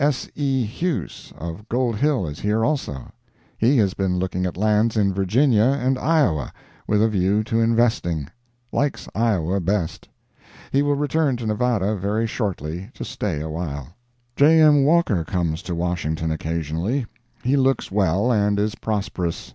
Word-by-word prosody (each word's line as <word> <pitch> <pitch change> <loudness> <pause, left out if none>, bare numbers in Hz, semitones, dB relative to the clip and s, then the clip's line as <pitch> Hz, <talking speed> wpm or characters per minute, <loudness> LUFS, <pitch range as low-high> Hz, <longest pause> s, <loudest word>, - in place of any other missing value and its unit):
S. 145 -4 +1
E. 135 -3 0
Huse 120 - -4
of 85 +7 -7
Gold 120 -1 0
Hill 140 - +1
is 75 -1 -6
here, 110 +2 +1
also. 130 - -3 0.4
He 130 +5 +3
has 100 -5 +2
been 95 -2 -1
looking 90 0 -1
at 85 - -6
lands 110 +2 +2
in 100 -2 +2
Virginia 115 +6 +3
and 130 +2 +1
Iowa, 135 - +1 0.4
with 105 0 +3
a - - +4
view 100 0 +1
to 115 +1 -1
investing; 115 - +1 0.4
likes 145 0 -1
Iowa 100 -5 +1
best. 95 -2 -2 0.6
He 140 - +3
will 145 0 +2
return 145 -2 +1
to 120 - -6
Nevada 110 -2 0
very 105 +4 -1
shortly, 95 - -3
to - - -6
stay 85 -8 -3
a 80 - -4
while. 75 -5 -5 0.5
J. 160 +3 +5
M. 150 -3 +6
Walker 145 - +3
comes 80 -1 -2
to 90 - -4
Washington 80 -2 -2
occasionally. 80 - -2 0.4
He 130 +3 +2
looks 135 -5 +1
well, 100 +4 +2
and 105 -2 +2
is 105 +1 0
prosperous. 95 -5 -3
105 Hz, 155 wpm, -22 LUFS, 90-125 Hz, 0.6 s, M